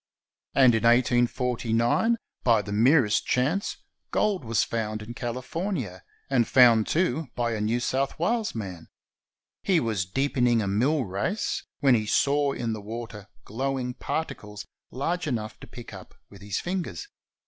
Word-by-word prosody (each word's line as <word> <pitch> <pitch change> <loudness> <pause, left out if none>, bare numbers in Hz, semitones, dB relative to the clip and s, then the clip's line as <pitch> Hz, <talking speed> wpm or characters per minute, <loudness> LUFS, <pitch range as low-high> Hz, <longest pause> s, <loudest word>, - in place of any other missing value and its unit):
And 130 -3 +6
in 110 - +1
1849, 120 - +2 0.3
by 115 -4 +4
the 100 - -7
merest 115 +1 +3
chance, 145 +11 0 0.3
gold 205 -6 0
was 115 -2 +1
found 110 -2 -3
in 115 +3 -8
CaUfornia, 125 - -4 0.3
and 125 -5 +2
found, 120 -4 +6
too, 160 -3 0
by 120 -1 0
a 110 - -3
New 110 +3 +1
South 135 +3 -1
Wales 215 - 0
man. 95 -7 -6 0.7
He 185 -4 +3
was 105 -7 -1
deepening 125 +1 +1
a 105 - -1
mill 130 +8 +1
race, 100 - -2 0.2
when 135 -2 +5
he 110 -3 +1
saw 140 +4 +2
in 115 -2 -2
the 110 - -6
water 110 -1 -7 0.2
glowing 130 +2 -2
particles 105 -9 -5 0.2
large 165 +7 -2
enough' 110 -6 -3
to - - -11
pick 120 -1 -11
up - - -11 0.2
with 100 -1 -14
his 100 -1 -3
fin 185 +1 -2
gers. 90 - -7
120 Hz, 150 wpm, -26 LUFS, 110-140 Hz, 0.7 s, And